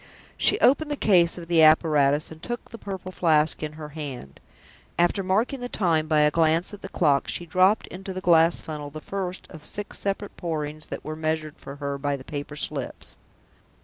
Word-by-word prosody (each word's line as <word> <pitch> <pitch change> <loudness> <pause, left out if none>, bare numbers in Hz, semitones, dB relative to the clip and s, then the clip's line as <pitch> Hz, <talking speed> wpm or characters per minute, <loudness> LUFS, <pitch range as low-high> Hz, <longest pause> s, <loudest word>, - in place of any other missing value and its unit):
She 415 - +3
opened 295 +4 +4
the 295 - -1
case 180 -10 +3
of 170 -1 -8
the 170 -1 +4
apparatus 155 -2 +4
and 160 0 -11
took 240 0 -6
the 230 - -9
Purple 190 -2 -6
Flask 155 -4 +2
in 155 -1 -4
her 155 -1 -8
hand. 140 - -7 0.6
After 175 +3 +2
marking 215 +8 0
the 245 0 -5
time 165 -8 +1
by 155 -1 +3
a 150 0 +4
glance 165 +4 +2
at 205 - -9
the 195 - -7
clock, 145 -8 +2
she 175 - -3
dropped 185 +5 +3
into 190 +1 -8
the 185 - -4
glass 170 -2 +4
funnel 150 -2 -6
the 155 +2 -8
first 185 +2 -5
of 160 - -10
the - - -6
six 205 0 -3
separate 200 +1 -3
Pourings 155 -3 -4
that - - -7
were 155 - -4
measured 155 -1 -2
for 140 - -9
her 140 -1 -4
by 145 0 0
the 135 - -9
paper 145 +1 -6
slips. 145 -3 -4
160 Hz, 205 wpm, -25 LUFS, 150-185 Hz, 0.6 s, opened